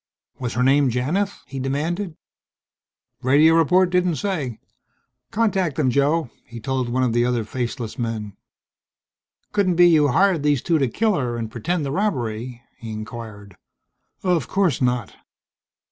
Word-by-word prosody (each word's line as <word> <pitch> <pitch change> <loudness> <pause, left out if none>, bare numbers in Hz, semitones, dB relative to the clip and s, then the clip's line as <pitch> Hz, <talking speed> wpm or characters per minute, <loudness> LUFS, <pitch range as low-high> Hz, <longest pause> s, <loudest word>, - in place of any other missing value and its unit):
"Was 125 -2 -3
her 125 - +1
name 135 +1 +4
Janith?" 160 - -1
he 135 0 -7
demanded. 155 +7 -2 1.1
"Radio 145 +5 +5
report 175 +3 +4
didn't 180 -2 +2
say. 155 - -3 0.7
Contact 195 -8 0
them, 135 -4 +1
Joe," 140 0 +1
he 120 -1 -10
told 130 0 -2
one 130 +2 +1
of 120 -3 +1
the 120 0 +3
other 120 -2 0
faceless 120 +1 -4
men. 110 -4 -4 1.2
"Couldn't 195 -4 +1
be 175 +1 +7
you 155 -4 +5
hired 180 +4 +3
these 145 -3 +1
two 165 -2 +2
to 135 - +2
kill 215 - +1
her 125 -8 -2
and 115 -1 -4
pretend 155 +7 -2
the 135 - -3
robbery?" 120 - -2 0.2
he 115 -1 -7
inquired. 110 -3 -8 0.7
"Of 175 -7 +1
course 190 -10 +1
not." 125 -4 0
135 Hz, 145 wpm, -22 LUFS, 120-175 Hz, 1.2 s, be